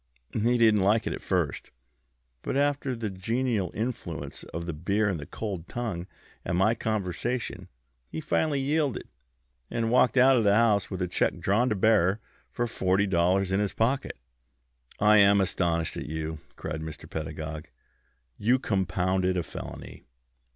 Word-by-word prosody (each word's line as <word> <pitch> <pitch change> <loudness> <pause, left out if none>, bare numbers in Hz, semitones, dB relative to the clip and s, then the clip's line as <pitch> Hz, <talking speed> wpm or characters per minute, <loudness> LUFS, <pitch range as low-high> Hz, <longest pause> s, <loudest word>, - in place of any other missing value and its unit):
He 120 +3 +2
didn't 110 -3 +5
like 105 +3 +3
it - - -1
at - - -6
first, - - -1 0.7
but - - -2
under 140 -2 +1
the 110 -3 -4
genial 110 0 -1
influence 110 -8 -4
of 85 +1 -6
the 85 - -3
beer 100 +7 0
and 95 -5 -1
the 70 - -8
cold 95 -6 -5
tongue 105 -8 -4 0.4
and 85 - -1
my 100 +5 +4
conversation 110 +2 -3 0.4
he - - -5
finally 155 -1 0
yielded, 145 -1 0 0.6
and 115 -1 -1
walked 125 +1 +4
out 130 +1 +6
of 115 - +2
my 100 - +4
house 110 -3 +3
with 95 -2 -3
a - - -1
check 90 - 0
drawn 115 +6 +2
to 105 - 0
bearer 100 -1 +3 0.3
for 120 - -2
forty 95 -3 +1
dollars 95 +1 +2
in 95 - +2
his 105 -1 -1
pocket." 130 - 0 0.8
"I 105 +1 +6
am 100 0 +6
astonished 85 -3 0
at - - -5
you!" 80 0 -4 0.2
cried 80 0 -5
Mr. 80 -1 -8
Pedagog. 80 0 -5 0.7
"You 120 +5 +3
compounded 95 -4 0
a 90 - 0
felony." - - -9
100 Hz, 160 wpm, -27 LUFS, 90-115 Hz, 0.8 s, out